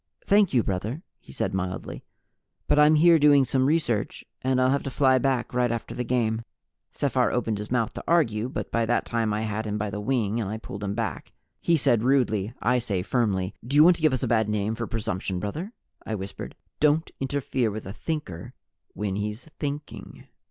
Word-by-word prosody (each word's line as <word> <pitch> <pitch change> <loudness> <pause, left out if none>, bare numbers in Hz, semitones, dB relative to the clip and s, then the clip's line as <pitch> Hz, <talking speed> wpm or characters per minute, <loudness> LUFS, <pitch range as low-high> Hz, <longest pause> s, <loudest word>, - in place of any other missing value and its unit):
"Thank 200 -2 +4
you, 120 -4 +3
brother," 110 - -3 0.2
he - - -15
said 95 - -2
mildly, 95 -1 -4 0.6
"but 150 - +3
I'm 150 +1 +6
here 165 +1 +6
doing 145 -2 +6
some 130 0 +1
research 140 -9 0 0.2
and 130 0 +1
I'll 130 0 +3
have 140 - +1
to - - -4
fly 130 -1 +3
back 130 -2 0
right 125 -1 +2
after 115 -1 -4
the 125 - -3
game." 115 -2 0 0.5
Sephar - - +1
opened 110 -3 -1
his 105 - -6
mouth 115 -3 0
to - - -7
argue, 120 -9 +2
but - - -5
by 115 -1 +1
that 120 - +1
time 115 -2 0
I 105 +1 -1
had 110 0 -3
him 105 0 -2
by 105 -1 -2
the 105 +1 -4
wing 115 -2 0
and 100 - -3
I 110 - -3
pulled 105 -2 -8
him 100 0 -2
back 105 - -4 0.3
he 170 - +2
said 125 -6 +2
rudely, 115 -5 +1
I 125 +1 +3
say 100 -7 -2
firmly. 100 -5 0
"Do 130 +5 -3
you 150 - +8
want 175 +2 +7
to - - -11
give 155 -1 +4
us 130 -1 -1
a - - +1
bad 110 -2 +2
name 105 +1 0
for 115 0 -4
presumption, 95 -4 -3
brother?" 155 - -4 0.3
I 110 - -3
whispered. 95 -1 -7 0.2
"Don't 150 +2 +2
interfere 135 -3 -1
with 110 +1 -6
a 95 - -6
Thinker 115 - -5 0.4
when 100 -2 -2
he's 105 +5 -4
Thinking!" 145 0 -6
115 Hz, 210 wpm, -26 LUFS, 105-135 Hz, 0.6 s, you